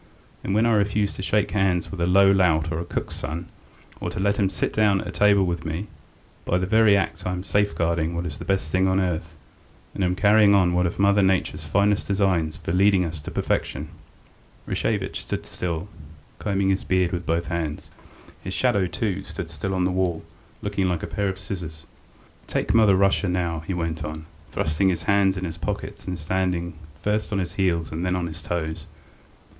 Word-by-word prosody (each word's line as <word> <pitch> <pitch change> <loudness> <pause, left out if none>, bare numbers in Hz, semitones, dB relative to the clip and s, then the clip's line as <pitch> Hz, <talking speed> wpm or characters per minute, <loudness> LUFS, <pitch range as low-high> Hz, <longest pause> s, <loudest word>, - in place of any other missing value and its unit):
And 95 - -1
when 110 +2 +4
I 115 - +3
refuse 105 -1 +1
to - - -7
shake 100 +1 +1
hands 95 -3 +1
with 95 -3 -5
a 85 - +2
low 95 +2 +6
lout 85 -4 +3
or 80 - -2
a 85 - -4
cook's - - -4
son, 85 +3 -4 0.5
or - - -3
to - - -5
let 100 +1 +1
him 100 -3 +2
sit 95 - -2
down 105 -2 +3
to - - -4
table 100 -2 +4
with 85 -2 -2
me, 85 +5 -4 0.5
by 90 - +1
that 95 +2 -2
very 110 -2 +6
act 90 -4 -2
I 90 - -1
am 90 0 -4
safeguarding 85 -5 0
what 85 +1 -2
is 75 -4 -6
the - - -6
best 95 -6 -1
thing 95 +1 +3
on 95 0 +2
earth, 85 -3 -2 0.6
and 95 - -2
am 90 0 +1
carrying 100 +1 +5
out 90 -3 +4
one 90 0 +2
of 85 - -5
Mother 100 +1 +4
Nature's 90 -5 +1
finest 100 +6 +2
designs 95 -6 +1
for 80 - -4
leading 95 0 +4
us 80 -1 -5
up 75 - -15
to - - -4
perfection.. 75 +3 -2 0.4
." - - -31
Rashevitch - - -1
stood - - -4
still, 85 +1 -4 0.5
combing 100 -2 +1
his 95 - 0
beard 90 -2 +1
with 85 -1 -4
both 85 +1 0
hands; 80 -3 -3 0.5
his - - -4
shadow, 95 -2 +2
too, 100 0 -2
stood - - -7
still 95 0 -3
on 90 -1 +1
the 90 - +1
wall, 90 -3 -1 0.4
looking 100 -2 0
like 85 -3 -2
a - - 0
pair 100 -1 -1
of 95 - -4
scissors. 85 -6 -7 0.6
"Take - - -1
Mother 110 -4 +6
Russia 100 0 +2
now," 85 -2 -1
he 95 - -1
went 80 -2 -2
on, 80 0 -6 0.2
thrusting 90 +5 +1
his 85 -3 -1
hands 100 +1 +3
in 90 - -3
his 85 -1 -6
pockets 80 - -5
and 90 -1 -3
standing 85 +1 -1 0.3
first 105 +4 -1
on 100 - 0
his 90 -3 -2
heels 85 -5 0
and 80 +3 -3
then 90 0 +1
on 90 -1 -1
his 80 0 -7
toes. 80 -2 -4
90 Hz, 210 wpm, -24 LUFS, 85-100 Hz, 0.6 s, low